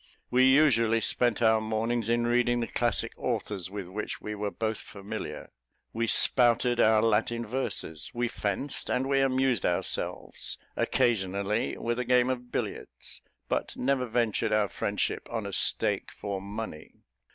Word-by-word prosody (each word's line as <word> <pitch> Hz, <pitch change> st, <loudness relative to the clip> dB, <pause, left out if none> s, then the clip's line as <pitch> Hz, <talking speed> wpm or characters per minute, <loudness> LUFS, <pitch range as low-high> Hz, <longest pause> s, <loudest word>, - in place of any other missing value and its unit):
We 130 Hz, +1 st, +5 dB
usually 125 Hz, -5 st, +4 dB
spent 120 Hz, 0 st, +2 dB
our 110 Hz, -1 st, +4 dB
mornings 110 Hz, +1 st, -1 dB
in 120 Hz, 0 st, +2 dB
reading 120 Hz, 0 st, +2 dB
the 115 Hz, -, 0 dB
classic 120 Hz, -3 st, -1 dB
authors 95 Hz, -4 st, -3 dB
with 100 Hz, -2 st, -6 dB
which 105 Hz, +4 st, -5 dB
we 105 Hz, -, -5 dB
were 105 Hz, 0 st, -2 dB
both 110 Hz, +3 st, -3 dB
familiar; 100 Hz, -1 st, -7 dB, 0.4 s
we 115 Hz, +1 st, -1 dB
spouted 120 Hz, +1 st, +4 dB
our 110 Hz, 0 st, +5 dB
Latin 115 Hz, +1 st, +1 dB
verses; 105 Hz, -, -2 dB
we 120 Hz, -1 st, -1 dB
fenced; 110 Hz, +5 st, -3 dB
and 130 Hz, +1 st, 0 dB
we 135 Hz, 0 st, +2 dB
amused 130 Hz, -2 st, +2 dB
ourselves, 85 Hz, -, -1 dB, 0.2 s
occasionally, 100 Hz, -2 st, 0 dB
with 120 Hz, +1 st, -2 dB
a 125 Hz, -, -1 dB
game 125 Hz, +1 st, +3 dB
of 125 Hz, -1 st, -5 dB
billiards, -, -, -5 dB, 0.3 s
but -, -, -2 dB
never 130 Hz, -1 st, 0 dB
ventured 115 Hz, -2 st, 0 dB
our 105 Hz, -2 st, +2 dB
friendship -, -, -2 dB
on -, -, -3 dB
a -, -, -5 dB
stake -, -, +1 dB
for 100 Hz, -2 st, -5 dB
money. 100 Hz, -5 st, -8 dB
115 Hz, 150 wpm, -28 LUFS, 105-125 Hz, 0.4 s, We